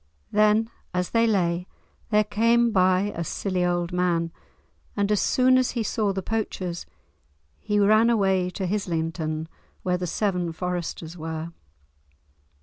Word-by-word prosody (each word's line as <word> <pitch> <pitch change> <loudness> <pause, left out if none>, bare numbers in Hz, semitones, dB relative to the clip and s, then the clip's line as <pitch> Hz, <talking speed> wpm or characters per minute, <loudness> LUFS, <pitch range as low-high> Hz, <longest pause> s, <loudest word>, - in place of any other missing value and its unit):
Then 215 +2 +3 0.2
as 180 0 -1
they 230 0 +3
lay, 180 -4 +1 0.4
there 210 -1 +4
came 230 +3 +2
by 185 +1 +2
a 170 - -2
silly 185 +2 -2
old 175 0 0
man, 170 -2 +1 0.7
and, 200 0 +1
as 210 - +3
soon 255 0 +4
as 255 - +1
he 230 - +1
saw 210 -1 0
the 190 -1 -3
poachers, 185 -5 -3 0.7
he 210 - -1
ran 215 +3 +5
away 190 -5 +2
to 190 +1 -4
Hislinton, 165 -4 -2 0.4
where 180 -1 +1
the 180 0 -3
Seven 180 -3 -1
Foresters 175 -1 -4
were. 160 +1 -5
185 Hz, 140 wpm, -25 LUFS, 175-210 Hz, 0.7 s, ran